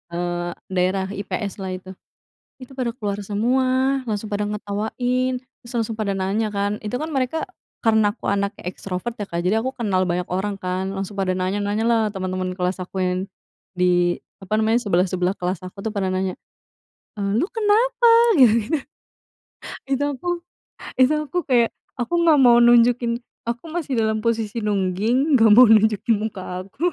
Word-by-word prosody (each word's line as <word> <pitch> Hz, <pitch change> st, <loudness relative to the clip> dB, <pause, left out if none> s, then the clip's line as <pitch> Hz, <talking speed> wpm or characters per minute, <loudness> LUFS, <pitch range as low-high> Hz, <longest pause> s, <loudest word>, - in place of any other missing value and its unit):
eee, 175 Hz, 0 st, -2 dB, 0.2 s
daerah 185 Hz, +1 st, +1 dB
IPS 200 Hz, 0 st, -4 dB
lah 190 Hz, -1 st, -4 dB
itu, 185 Hz, +1 st, -10 dB, 0.7 s
itu 255 Hz, 0 st, -12 dB
pada 255 Hz, -3 st, -1 dB
keluar 205 Hz, -4 st, -4 dB
semua 255 Hz, +6 st, +1 dB
langsung 215 Hz, 0 st, -2 dB
pada 205 Hz, 0 st, 0 dB
ngetawain 235 Hz, +5 st, -1 dB, 0.2 s
terus 235 Hz, -, -11 dB
langsung 225 Hz, -1 st, -1 dB
pada 200 Hz, -2 st, -1 dB
nanya 195 Hz, +4 st, 0 dB
kan 205 Hz, 0 st, -2 dB
itu 210 Hz, +2 st, -5 dB
kan 310 Hz, +5 st, -4 dB
mereka 270 Hz, +3 st, -1 dB, 0.4 s
karena 220 Hz, -2 st, +4 dB
aku -, -, -9 dB
anaknya 200 Hz, +1 st, -2 dB
ekstrovert 185 Hz, +4 st, -4 dB
ya, 205 Hz, -, -4 dB
Kak, 170 Hz, -, -3 dB
jadi 215 Hz, +4 st, +2 dB
aku 260 Hz, -, -1 dB
kenal 200 Hz, -6 st, 0 dB
banyak 175 Hz, +1 st, -1 dB
orang 195 Hz, +2 st, -1 dB
kan 185 Hz, 0 st, -2 dB
langsung 195 Hz, +1 st, -5 dB
pada 195 Hz, -2 st, -1 dB
nanya-nanya 205 Hz, +3 st, -1 dB
lah 230 Hz, -1 st, +3 dB
teman-teman 185 Hz, -1 st, -3 dB
kelas 180 Hz, +1 st, -1 dB
aku 185 Hz, +1 st, -7 dB
yang, 180 Hz, 0 st, 0 dB, 0.6 s
di 175 Hz, -1 st, +2 dB, 0.2 s
apa 195 Hz, +2 st, -2 dB
namanya 220 Hz, +2 st, +2 dB
sebelah-sebelah 185 Hz, -2 st, 0 dB
kelas 180 Hz, 0 st, -3 dB
aku 195 Hz, +2 st, -11 dB
tuh 220 Hz, -, -2 dB
pada 195 Hz, -3 st, -1 dB
nanya, 185 Hz, 0 st, -1 dB, 0.8 s
eee, 200 Hz, -1 st, -2 dB
"lo 330 Hz, -, +1 dB
kenapa?" 450 Hz, +2 st, +1 dB, 0.4 s
Gitu-gitu. 235 Hz, +4 st, +4 dB, 1.1 s
Itu 275 Hz, +1 st, 0 dB
aku 355 Hz, -, -6 dB, 0.7 s
itu 260 Hz, +3 st, +4 dB
aku 305 Hz, +3 st, -3 dB
kayak 240 Hz, -3 st, +3 dB, 0.3 s
aku 245 Hz, +7 st, -2 dB
nggak 320 Hz, -3 st, +5 dB
mau 240 Hz, -2 st, +6 dB
nunjukin 235 Hz, 0 st, +4 dB, 0.3 s
aku 235 Hz, +4 st, -3 dB
masih 295 Hz, -7 st, -2 dB
dalam 220 Hz, -1 st, +1 dB
posisi 230 Hz, -1 st, -1 dB
nungging, 210 Hz, -, +1 dB
gak 225 Hz, -1 st, +6 dB
mau 250 Hz, -, +10 dB
nunjukin 220 Hz, 0 st, +4 dB
muka 185 Hz, -4 st, -5 dB
aku. 340 Hz, -, -1 dB
210 Hz, 160 wpm, -22 LUFS, 190-240 Hz, 1.1 s, mau